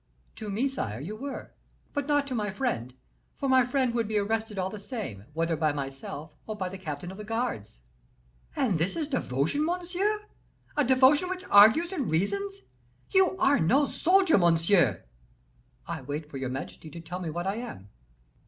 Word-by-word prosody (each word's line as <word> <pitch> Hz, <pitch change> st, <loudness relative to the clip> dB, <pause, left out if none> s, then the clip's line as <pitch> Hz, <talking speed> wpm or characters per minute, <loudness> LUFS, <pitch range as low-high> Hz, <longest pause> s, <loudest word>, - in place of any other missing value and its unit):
"To 215 Hz, -2 st, -6 dB
me, 225 Hz, +7 st, +1 dB
sire, 115 Hz, -, -3 dB
you 180 Hz, +10 st, -5 dB
were, 275 Hz, +5 st, -7 dB, 0.4 s
but 285 Hz, -2 st, -2 dB
not 290 Hz, -1 st, +2 dB
to 275 Hz, -, -5 dB
my 210 Hz, -3 st, -1 dB
friend, 160 Hz, -, -2 dB, 0.4 s
for 275 Hz, -, -2 dB
my 260 Hz, -1 st, +5 dB
friend 250 Hz, 0 st, +1 dB
would 230 Hz, -2 st, 0 dB
be 215 Hz, 0 st, 0 dB
arrested 220 Hz, +1 st, -1 dB
all 190 Hz, 0 st, -1 dB
the 215 Hz, -, -7 dB
same, 200 Hz, -, -6 dB
whether 165 Hz, +1 st, 0 dB
by 155 Hz, -1 st, +1 dB
myself 140 Hz, +2 st, -6 dB
or 215 Hz, -, -3 dB
by 185 Hz, -3 st, -3 dB
the 190 Hz, +1 st, -8 dB
captain 160 Hz, 0 st, -5 dB
of 190 Hz, -, -10 dB
the -, -, -5 dB
guards." 225 Hz, -, -3 dB, 0.7 s
"And 205 Hz, -, +1 dB
this 175 Hz, +4 st, 0 dB
is 310 Hz, -2 st, -3 dB
your 260 Hz, -, +1 dB
devotion, 140 Hz, -, 0 dB
monsieur! 360 Hz, +5 st, -1 dB, 0.5 s
a 295 Hz, -, +3 dB
devotion 265 Hz, +6 st, +5 dB
which 375 Hz, 0 st, -4 dB
argues 220 Hz, -, +7 dB
and 290 Hz, -10 st, -2 dB
reasons. 395 Hz, -, -1 dB, 0.5 s
You 375 Hz, -1 st, +4 dB
are 280 Hz, -5 st, +4 dB
no 265 Hz, -, +4 dB
soldier, 360 Hz, -, +3 dB
monsieur!" 170 Hz, -, +3 dB, 0.8 s
"I -, -, -5 dB
wait 145 Hz, +3 st, -5 dB
for 135 Hz, -, -5 dB
your 130 Hz, -1 st, -3 dB
majesty 135 Hz, +4 st, -6 dB
to 170 Hz, -, -9 dB
tell 175 Hz, +2 st, -6 dB
me 175 Hz, -3 st, -4 dB
what 175 Hz, +3 st, -3 dB
I 195 Hz, +3 st, -1 dB
am." 230 Hz, -, -7 dB
215 Hz, 185 wpm, -28 LUFS, -, 0.8 s, argues